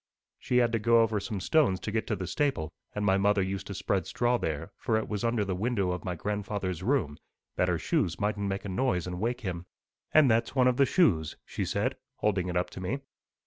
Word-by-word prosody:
She 125 - 0
had 120 -1 +4
to 115 - +1
go 115 +2 +5
over 110 -2 0
some 100 0 -4
stones 115 - +3
to 105 - -3
get 110 +1 -1
to 110 - 0
the 95 - -4
stable, 90 - -1 0.2
and 105 0 -1
my 95 -1 +4
mother 100 0 +3
used 95 0 -4
to 100 - -5
spread 95 0 -1
straw 120 0 +1
there, 80 +4 -3
for 115 -3 0
it 110 - -2
was 105 +1 -3
under 115 -3 +1
the 95 - -1
window 100 -1 0
of 90 - -4
my 90 -4 -3
grandfather's 100 -1 -3
room, 95 - 0 0.4
that - - +2
her - - +1
shoes 85 +1 0
mightn't 105 -1 -1
make 95 +1 -3
a - - -4
noise 95 -3 0
and 90 0 -5
wake 120 +4 -1
him. 90 -4 -4 0.4
And 155 -3 +6
that's 115 +2 +2
one 130 -2 +4
of 125 -1 +2
the 140 - +5
shoes,' 85 - +2
she - - -3
said, - - -1 0.2
holding 95 -4 0
it 90 0 -1
up 90 - -1
to - - -8
me. 120 +10 -2
105 Hz, 235 wpm, -29 LUFS, 90-115 Hz, 0.4 s, And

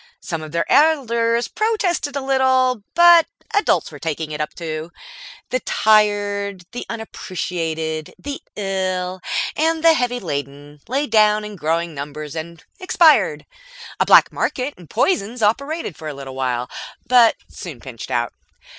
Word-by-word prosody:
Some 165 -5 -5
of 155 -1 -8
their 170 +1 0
elders 235 -6 +3
protested 380 -10 -1
a 280 - -1
little, 260 -3 +2
but 345 -1 +7 0.3
adults 410 0 +2
were - - -10
taking 160 -1 -3
it 150 0 -3
up 150 - -4
too. 160 -1 -5 0.6
The 255 - +1
tired, 205 -4 +1
the 245 - -6
unappreciated, 165 -7 -4
the 285 -1 -6
ill 185 -2 -2 0.3
and 320 +1 +1
the 330 -1 +7
heavy 245 -4 0
laden 145 - -6
lay 275 +4 0
down 215 -3 +3
in 210 -1 -8
growing 165 0 -1
numbers 150 +1 -7
and 165 +1 -7 0.2
expired. 340 -4 +4 0.5
A - - +3
black - - +7
market 265 +3 -2
in 175 - -15
poisons 230 - 0
operated 280 - 0
for 155 - -8
a 150 - -5
little 135 -1 -8
while, 125 -2 -2 0.4
but 245 -3 +5
soon 160 -9 -9
pinched 115 -2 -9
out. 120 0 -1
205 Hz, 145 wpm, -20 LUFS, 160-260 Hz, 0.6 s, but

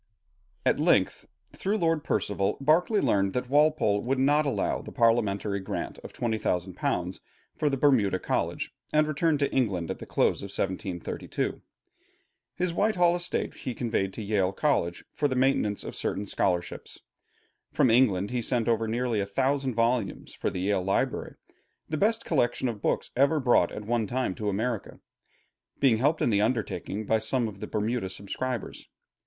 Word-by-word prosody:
At - - +3
length, - - +2 0.3
through 205 +3 -1
Lord 165 -5 +1
Percival, 100 -1 0
Berkeley 170 +9 +3
learned 95 -1 +2
that 125 0 -3
Walpole 145 -9 +3
would 130 +2 -1
not 145 +3 +3
allow 140 - 0
the - - -9
parliamentary 110 -4 +1
grant 95 - -5
of, - - -10
£20,000 90 -4 -2 0.4
for 150 - +1
the 135 - -1
Bermuda 125 -9 +3
College, - - -2 0.2
and 155 0 +3
returned 155 +1 +1
to 140 - +1
England 100 -10 0
at - - -6
the - - -9
close - - +1
of - - -5
1732. 95 -2 -3 0.9
His 180 -1 -1
Whitehall 175 -3 +3
estate 175 0 -2
he 125 - -6
conveyed 110 -5 -1
to 110 - -6
Yale 100 -3 +1
College 95 - 0
for 145 - +1
the 130 - -2
maintenance 125 -6 +1
of - - -7
certain 105 - -2
scholarships. 90 -2 -2 0.7
From 125 - +3
England 105 -5 +3
he 125 -1 -1
sent 120 -1 0
over 115 -1 +1
nearly 120 0 0
a 100 - -1
thousand 130 +4 0
volumes 120 +1 0
for - - -2
the 90 - -4
Yale 100 0 +1
library, 95 +1 -1 0.5
the 155 - -2
best 220 +6 +1
collection 130 -4 +1
of 110 -4 -4
books - - -1
ever 140 +4 +3
brought 120 -10 +3
at 105 - -7
one 115 -1 0
time 125 -3 -1
to 105 +2 -3
America, 110 +2 -3 0.8
being 130 -5 +4
helped 145 +7 +2
in - - +2
the 100 -1 +3
undertaking 110 -3 -2
by 110 +2 +2
some 115 +2 0
of 100 -2 -9
the - - -5
Bermuda 110 -1 -1
subscribers. 110 +5 -5
120 Hz, 165 wpm, -27 LUFS, 100-140 Hz, 0.9 s, being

